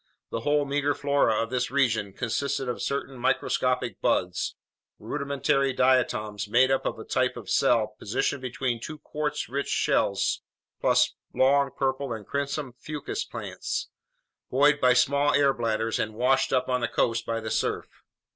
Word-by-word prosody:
The -, -, -2 dB
whole 145 Hz, +4 st, +1 dB
meager 145 Hz, +1 st, 0 dB
flora 140 Hz, -6 st, +2 dB
of 115 Hz, -, -7 dB
this 125 Hz, -1 st, 0 dB
region 115 Hz, -7 st, +1 dB
consisted 130 Hz, +4 st, -2 dB
of 125 Hz, -, -3 dB
certain 140 Hz, -2 st, -3 dB
microscopic 120 Hz, -, 0 dB
buds, 90 Hz, -1 st, 0 dB, 0.4 s
rudimentary 140 Hz, -1 st, 0 dB
diatoms 110 Hz, -6 st, +1 dB
made 130 Hz, +5 st, +4 dB
up 135 Hz, -, +1 dB
of -, -, -3 dB
a -, -, -7 dB
type -, -, 0 dB
of -, -, -7 dB
cell 110 Hz, -2 st, +2 dB
positioned 130 Hz, +5 st, -1 dB
between 125 Hz, -1 st, -2 dB
two 155 Hz, -, -6 dB
quartz 150 Hz, 0 st, -3 dB
rich 140 Hz, +3 st, -3 dB
shells, -, -, +1 dB, 0.4 s
plus -, -, +3 dB, 0.2 s
long 140 Hz, +1 st, +4 dB
purple 135 Hz, -1 st, -1 dB
and 110 Hz, -2 st, -7 dB
crimson 140 Hz, -1 st, -3 dB
fucus 150 Hz, 0 st, -4 dB
plants, -, -, -5 dB, 0.6 s
buoyed 145 Hz, +2 st, +4 dB
by 125 Hz, 0 st, +6 dB
small 140 Hz, +3 st, +3 dB
air 140 Hz, -1 st, +4 dB
bladders 115 Hz, -1 st, -1 dB
and 110 Hz, 0 st, -2 dB
washed 135 Hz, +3 st, +2 dB
up 130 Hz, -1 st, +1 dB
on 125 Hz, -1 st, 0 dB
the 120 Hz, -, +1 dB
coast 115 Hz, 0 st, 0 dB
by 115 Hz, 0 st, -1 dB
the 110 Hz, -1 st, -5 dB
surf. 110 Hz, -, -2 dB
130 Hz, 155 wpm, -27 LUFS, 115-140 Hz, 0.6 s, by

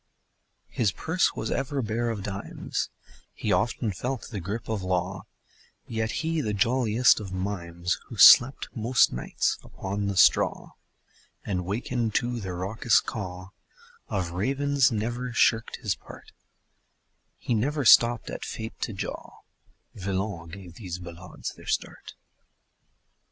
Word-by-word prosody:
His 110 Hz, -6 st, +1 dB
purse 165 Hz, -, 0 dB
was 110 Hz, -, -3 dB
ever 135 Hz, +1 st, -1 dB
bare 115 Hz, +2 st, -1 dB
of 105 Hz, -4 st, -3 dB
dimes; 100 Hz, 0 st, -4 dB, 0.5 s
He 105 Hz, -, -2 dB
often 110 Hz, +3 st, 0 dB
felt 125 Hz, +7 st, -4 dB
the 105 Hz, -5 st, -4 dB
grip 100 Hz, +6 st, -5 dB
of 110 Hz, -3 st, -2 dB
law; 95 Hz, +1 st, -2 dB, 0.6 s
Yet 110 Hz, -1 st, -2 dB, 0.2 s
he, 165 Hz, -1 st, 0 dB
the 105 Hz, -6 st, -2 dB
jolliest 120 Hz, +3 st, +3 dB
of 100 Hz, -3 st, -7 dB
mimes, 90 Hz, -2 st, -3 dB
Who -, -, -9 dB
slept 130 Hz, +3 st, +8 dB
most 120 Hz, +2 st, +3 dB
nights 60 Hz, -, -1 dB
upon 100 Hz, +1 st, -4 dB
the 100 Hz, -1 st, -2 dB
straw -, -, +4 dB, 0.7 s
And 90 Hz, -3 st, -2 dB
wakened 115 Hz, +2 st, -2 dB
to 120 Hz, -1 st, 0 dB
the 95 Hz, -4 st, -5 dB
raucous 100 Hz, +6 st, +2 dB
caw 95 Hz, -3 st, -6 dB, 0.6 s
Of 90 Hz, -4 st, -2 dB
ravens, 135 Hz, +8 st, +2 dB
never 120 Hz, +3 st, -2 dB
shirked 115 Hz, -1 st, +2 dB
his -, -, -1 dB
part; -, -, -13 dB, 1.1 s
He -, -, -2 dB
never 140 Hz, +6 st, 0 dB
stopped 120 Hz, -1 st, +6 dB
at -, -, -6 dB
fate 110 Hz, 0 st, -6 dB
to 115 Hz, -, -2 dB
jaw 95 Hz, -, -7 dB, 0.5 s
Villon 95 Hz, -3 st, -3 dB
gave 90 Hz, -1 st, -10 dB
these 90 Hz, -5 st, -5 dB
ballades 90 Hz, 0 st, -8 dB
their -, -, -15 dB
start. -, -, -3 dB
105 Hz, 135 wpm, -27 LUFS, 95-120 Hz, 1.1 s, slept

